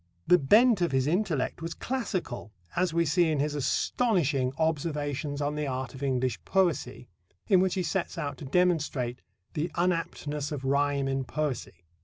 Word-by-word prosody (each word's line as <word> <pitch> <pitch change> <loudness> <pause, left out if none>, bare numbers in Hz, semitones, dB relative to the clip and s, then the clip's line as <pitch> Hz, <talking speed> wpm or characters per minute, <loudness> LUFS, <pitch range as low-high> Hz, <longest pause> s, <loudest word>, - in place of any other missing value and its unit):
The 180 - +6
bent 215 - +5
of 175 - +2
his 130 -1 +2
intellect 165 -4 0
was 165 0 -4
classical, 185 - -3 0.2
as 180 0 +2
we 170 +1 +2
see 165 +2 +3
in 155 -2 0
his 150 +1 0
astonishing 150 - +1
Observations 145 -2 -1
on 145 +1 0
the 150 -1 -2
Art 130 -2 -3
of 130 - -10
English 130 -3 -1
Poesy, 170 -10 0 0.4
in 190 - +5
which 185 0 +2
he 185 - 0
sets 175 +3 -2
out 145 -5 -4
to - - -7
demonstrate 150 -6 +1 0.3
"the 155 +3 -1
unaptness 165 -4 -1
of 145 -3 -4
rhyme 140 0 +1
in 135 0 -1
poesy." 130 - -4
150 Hz, 165 wpm, -28 LUFS, 135-175 Hz, 0.4 s, The